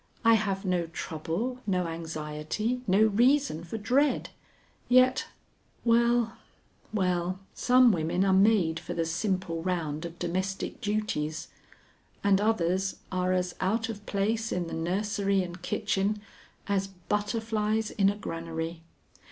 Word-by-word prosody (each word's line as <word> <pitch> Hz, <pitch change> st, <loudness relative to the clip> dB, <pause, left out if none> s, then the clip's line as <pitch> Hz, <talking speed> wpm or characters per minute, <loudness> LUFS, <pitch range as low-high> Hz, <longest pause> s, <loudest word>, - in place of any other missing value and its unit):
I 230 Hz, -, +7 dB
have 200 Hz, -3 st, 0 dB
no 180 Hz, -2 st, 0 dB
trouble, 170 Hz, +10 st, -3 dB
no 180 Hz, -2 st, +1 dB
anxiety, 165 Hz, +8 st, -3 dB
no 195 Hz, +3 st, +5 dB
reason 240 Hz, -, +3 dB
for 175 Hz, +6 st, -5 dB
dread; 260 Hz, +7 st, +1 dB, 0.6 s
yet 255 Hz, +1 st, +5 dB, 0.6 s
Well, 235 Hz, 0 st, +3 dB, 0.5 s
well, 180 Hz, -3 st, 0 dB, 0.2 s
some 250 Hz, -1 st, +5 dB
women 175 Hz, +1 st, +1 dB
are 190 Hz, -, +3 dB
made 190 Hz, -5 st, +4 dB
for -, -, -6 dB
the 165 Hz, -, 0 dB
simple 175 Hz, 0 st, -1 dB
round 165 Hz, -4 st, -2 dB
of 170 Hz, 0 st, -8 dB
domestic 185 Hz, +3 st, -3 dB
duties, 180 Hz, -8 st, -2 dB, 0.7 s
and 200 Hz, -1 st, +4 dB
others 190 Hz, -3 st, +1 dB, 0.2 s
are 185 Hz, 0 st, 0 dB
as 180 Hz, -1 st, 0 dB
out 220 Hz, +5 st, 0 dB
of 205 Hz, -2 st, -6 dB
place 220 Hz, +3 st, 0 dB
in 180 Hz, -1 st, -1 dB
the 165 Hz, -, -7 dB
nursery 195 Hz, +3 st, 0 dB
and 175 Hz, 0 st, -8 dB
kitchen 210 Hz, +1 st, 0 dB, 0.5 s
as 195 Hz, -1 st, 0 dB
butterflies 210 Hz, +3 st, -1 dB
in 195 Hz, -1 st, +3 dB
a 205 Hz, -, -1 dB
granary. 165 Hz, -3 st, -5 dB
195 Hz, 125 wpm, -28 LUFS, 170-220 Hz, 0.7 s, I